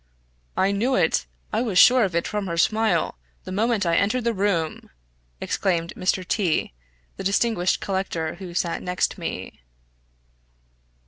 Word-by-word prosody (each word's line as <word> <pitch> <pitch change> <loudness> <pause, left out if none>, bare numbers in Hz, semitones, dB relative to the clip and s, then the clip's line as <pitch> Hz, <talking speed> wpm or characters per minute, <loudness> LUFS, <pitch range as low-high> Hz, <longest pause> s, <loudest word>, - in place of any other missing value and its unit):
"I 195 +1 +3
knew 235 +7 +1
it! - - +2 0.3
I 220 - +1
was 220 -7 -1
sure 250 +5 +7
of 185 -4 -1
it 170 - 0
from 210 -2 -3
her 170 -1 -3
smile, 215 - +1 0.2
the - - -8
moment 215 +1 +1
I 165 -1 +2
entered 230 +5 +1
the 235 0 +1
room!" 190 -6 -1 0.5
exclaimed 170 -3 -1
Mr. 185 0 -1
T 180 - 0 0.4
the - - -5
distinguished 195 -1 +1
collector, 190 -5 -2
who 175 -1 -9
sat 170 -1 -1
next 180 0 -1
me. - - -6
195 Hz, 145 wpm, -24 LUFS, 175-215 Hz, 0.5 s, sure